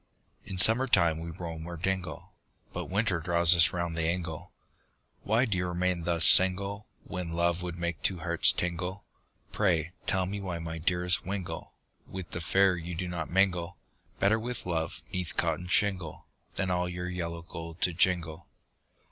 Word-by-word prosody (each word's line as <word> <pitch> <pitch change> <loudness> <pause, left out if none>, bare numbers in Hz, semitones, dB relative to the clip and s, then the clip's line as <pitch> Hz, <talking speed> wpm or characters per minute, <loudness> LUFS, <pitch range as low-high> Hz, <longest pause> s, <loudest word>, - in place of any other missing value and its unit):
In 95 - -7
summer 115 +7 +9
time 85 -8 +2
we 85 +1 -7
roam 80 -1 -7
o'er 85 -1 -7
dingle, 95 +1 -4 0.4
But - - -4
winter 100 -2 0
draws 85 +1 +4
us 85 -2 +6
round 85 -1 -3
the 80 -1 -1
ingle, 85 -3 -4 0.7
Why 115 +5 +1
do 100 -7 -2
you 90 - -2
remain 90 -1 -2
thus 85 -2 +5
single, 100 +3 +5 0.2
When 90 -2 -6
love 85 +1 0
would 90 -1 -6
make 85 -1 -4
two 95 - 0
hearts - - +4
tingle, 90 +3 -4 0.5
Pray, 90 -5 0 0.2
tell 95 -1 0
me 100 +2 -5
why 90 -3 -4
my 80 0 -6
dearest 90 +2 0
wingle, 95 -1 -6 0.3
With 95 -2 -8
the 85 - -5
fair 95 +3 +2
you 85 +1 -6
do 90 +2 -4
not 85 -3 -5
mingle, 90 -2 0 0.4
Better 110 +3 +2
with 120 +1 -6
love 80 -3 -3
'neath 90 -4 -4
cot - - 0
of 90 +1 -8
shingle, 95 -7 -1 0.3
Than 95 -1 -2
all 90 0 -1
your 90 0 -5
yellow 85 -2 -5
gold 85 0 -9
to 90 - +1
jingle. 85 -2 0
90 Hz, 175 wpm, -28 LUFS, 85-95 Hz, 0.7 s, summer